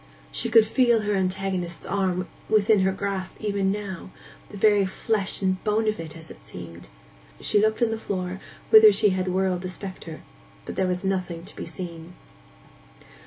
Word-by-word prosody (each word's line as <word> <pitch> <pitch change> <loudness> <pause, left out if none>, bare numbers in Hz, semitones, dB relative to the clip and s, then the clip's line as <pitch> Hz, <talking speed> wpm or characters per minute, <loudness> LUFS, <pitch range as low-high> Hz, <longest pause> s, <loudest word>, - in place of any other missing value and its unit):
She 235 - -1
could 225 -1 +6
feel 235 0 +3
her 210 0 -1
antagonist's 185 -2 -2
arm 185 -2 -1 0.2
within 215 0 +4
her 190 0 +2
grasp 190 -1 -4
even 200 -2 0
now—the 200 0 -8
very 205 0 +4
flesh 195 +1 -1
and 185 -1 0
bone 215 +1 +1
of 215 -3 0
it, 165 0 -7
as 160 -1 -12
it - - -14
seemed. 85 -4 -10 0.5
She 205 - +2
looked 220 +2 +2
on 230 - +2
the 225 - -3
floor 185 -2 -4 0.3
whither 435 -1 +10
she 215 - +3
had 185 -1 -1
whirled 185 -1 0
the 185 - -4
spectre, 185 -3 -6 0.4
but - - -6
there 190 - +1
was 180 0 -2
nothing 185 -3 -2
to - - -12
be - - -6
seen. 170 -1 -8
190 Hz, 170 wpm, -25 LUFS, 180-210 Hz, 0.5 s, whither